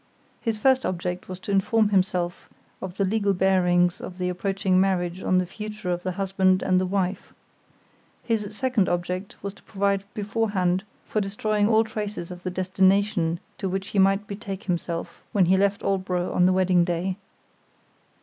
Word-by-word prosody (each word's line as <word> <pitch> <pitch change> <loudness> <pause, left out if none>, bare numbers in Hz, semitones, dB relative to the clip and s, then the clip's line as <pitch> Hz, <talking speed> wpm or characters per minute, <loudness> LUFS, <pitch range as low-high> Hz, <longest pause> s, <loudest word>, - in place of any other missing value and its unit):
His 225 -2 -1
first 260 +4 +3
object 180 0 -3
was 185 - -5
to 200 - -4
inform 205 +2 +3
himself 185 -3 0 0.3
of 185 0 -6
the 195 - +2
legal 200 0 +1
bearings 180 -2 +3
of 180 - -8
the 180 -1 -1
approaching 190 0 +1
marriage 185 -2 0
on 185 - +2
the 185 - +2
future 210 0 -5
of 175 0 -1
the 185 0 -3
husband 190 -1 +2
and 185 -1 +3
the 185 - 0
wife. 190 0 -2 0.9
His 220 -3 0
second 255 -7 +1
object 180 +2 -2
was 200 -1 -4
to 200 - -19
provide 200 -1 0
beforehand 200 -4 0 0.2
for 215 - -1
destroying 205 +1 0
all 220 0 +5
traces 210 -5 -5
of 180 0 -8
the 185 - -3
destination 185 -1 +2 0.2
to 195 - -2
which 195 +1 -3
he 200 - 0
might 195 +2 +4
betake 200 0 -6
himself 170 -3 -3
when 200 -4 +4
he 185 +2 +4
left 200 +1 +1
Aldborough 185 -2 -1
on 180 - +4
the 185 - +3
wedding 185 -1 +3
day. 180 +2 -1
190 Hz, 170 wpm, -25 LUFS, 180-200 Hz, 0.9 s, all